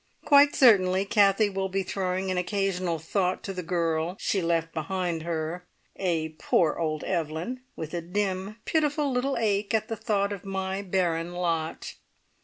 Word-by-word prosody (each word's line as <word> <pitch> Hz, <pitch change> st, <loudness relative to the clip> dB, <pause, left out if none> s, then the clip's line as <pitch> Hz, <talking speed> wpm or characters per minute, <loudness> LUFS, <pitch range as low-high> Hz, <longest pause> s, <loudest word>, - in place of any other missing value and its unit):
Quite 285 Hz, 0 st, +6 dB
certainly 195 Hz, -6 st, +5 dB
Kathie 205 Hz, +1 st, +3 dB
will 190 Hz, 0 st, -2 dB
be 195 Hz, +1 st, -1 dB
throwing 185 Hz, 0 st, -2 dB
an 185 Hz, -, -1 dB
occasional 185 Hz, -2 st, -1 dB
thought 180 Hz, +3 st, -1 dB
to 195 Hz, -, -4 dB
the 185 Hz, -, -4 dB
girl 170 Hz, 0 st, -1 dB
she 195 Hz, -, 0 dB
left 165 Hz, -1 st, 0 dB
behind 170 Hz, +1 st, -2 dB
her, 170 Hz, +2 st, -4 dB, 0.3 s
a 165 Hz, -4 st, -1 dB
"poor 160 Hz, -4 st, +2 dB
old 155 Hz, -2 st, -1 dB
Evelyn!" 170 Hz, +8 st, -3 dB
with 160 Hz, 0 st, -6 dB
a 175 Hz, -, -2 dB
dim, 190 Hz, +3 st, -2 dB
pitiful 295 Hz, -2 st, +1 dB
little 260 Hz, +2 st, 0 dB
ache 210 Hz, -2 st, +1 dB
at 220 Hz, +1 st, -1 dB
the 225 Hz, -, -2 dB
thought 205 Hz, -3 st, 0 dB
of 200 Hz, -, -8 dB
my 190 Hz, 0 st, -3 dB
barren 175 Hz, -3 st, -1 dB
lot. 165 Hz, -3 st, -2 dB
185 Hz, 160 wpm, -27 LUFS, 170-200 Hz, 0.3 s, Quite